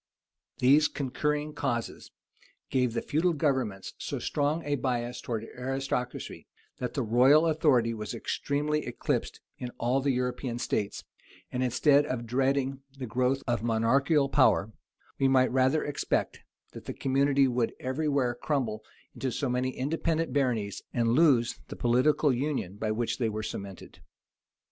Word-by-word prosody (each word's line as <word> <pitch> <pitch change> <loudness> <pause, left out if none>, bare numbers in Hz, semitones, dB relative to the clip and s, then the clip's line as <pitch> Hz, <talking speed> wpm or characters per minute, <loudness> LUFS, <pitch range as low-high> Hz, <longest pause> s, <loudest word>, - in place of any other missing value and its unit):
These 145 +4 +5
concurring 150 +2 -2
causes 120 -6 -3 0.6
gave 125 -3 +1
the 115 - -1
feudal 170 +4 +1
governments 130 -10 -1
so - - -4
strong 150 +3 -1
a 145 - -1
bias 125 -2 -2
towards 115 -2 -3
aristocracy, 130 -1 -3 0.3
that 125 - -4
the 135 - 0
royal 130 +8 +5
authority 145 -8 +3
was 105 +1 -5
extremely 150 +5 -1
eclipsed 120 - -2 0.2
in 125 - -4
all 125 +3 +1
the 140 - 0
European 125 -1 -1
states; 105 -4 -2 0.5
and, 125 0 -1
instead 145 +3 +3
of 120 -3 -3
dreading 135 +2 0 0.2
the 130 - -4
growth 130 +4 0
of 120 -2 0
monarchical 130 +6 +2
power, 110 -6 +3 0.5
we 135 - +4
might 130 -1 +4
rather 130 +4 +2
expect, 145 - -1 0.3
that - - -11
the - - -4
community 135 0 +2
would 120 -2 0
every 140 +4 -1
where 130 -4 +1
crumble 120 -5 -2 0.3
into 130 - -3
so 135 +3 -2
many 125 +1 0
independent 160 +3 -1
baronies, 120 -8 0
and 115 -2 +1
lose 125 -3 +3
the - - -7
political 130 +4 +3
union 130 -8 -2
by 110 +1 -3
which 115 +4 -1
they 115 -3 +1
were 110 0 -4
cemented. 100 -2 -7
130 Hz, 145 wpm, -28 LUFS, 120-140 Hz, 0.6 s, These